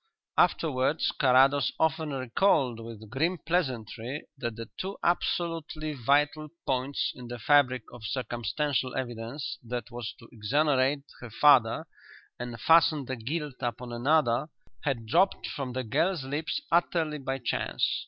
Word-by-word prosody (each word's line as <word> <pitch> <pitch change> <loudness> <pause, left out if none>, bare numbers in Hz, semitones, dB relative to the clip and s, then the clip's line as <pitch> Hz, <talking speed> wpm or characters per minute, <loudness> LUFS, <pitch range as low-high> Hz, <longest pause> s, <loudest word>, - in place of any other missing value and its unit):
Afterwards 150 0 +2
Carrados 135 -1 +5
often 160 0 +1
recalled 130 - +1
with 115 -1 -9
grim 165 +8 +1
pleasantry 130 - -2
that 120 -5 -4
the 115 -1 -7
two 195 +2 -4
absolutely 165 -3 -1
vital 145 +4 +1 0.2
points 130 +1 0
in 125 -1 -10
the 120 0 -6
fabric 130 0 +3
of 120 -2 -11
circumstantial 130 +3 -1
evidence 120 +2 -4
that 120 0 -5
was 120 -2 -5
to 115 - -15
exonerate 135 +4 +1 0.2
her 120 - -8
father 120 -1 +4 0.5
and 120 -2 -5
fasten 160 -1 +5
the 130 - -3
guilt 145 +3 -4
upon 120 0 -4
another 135 +1 +2 0.4
had 130 -6 -1
dropped 190 - +2
from 135 -4 -4
the 130 0 -2
girl's 155 - 0
lips 145 - -2
utterly 165 -3 +1
by 135 0 -2
chance. 125 - -1
135 Hz, 135 wpm, -28 LUFS, 120-150 Hz, 0.5 s, Carrados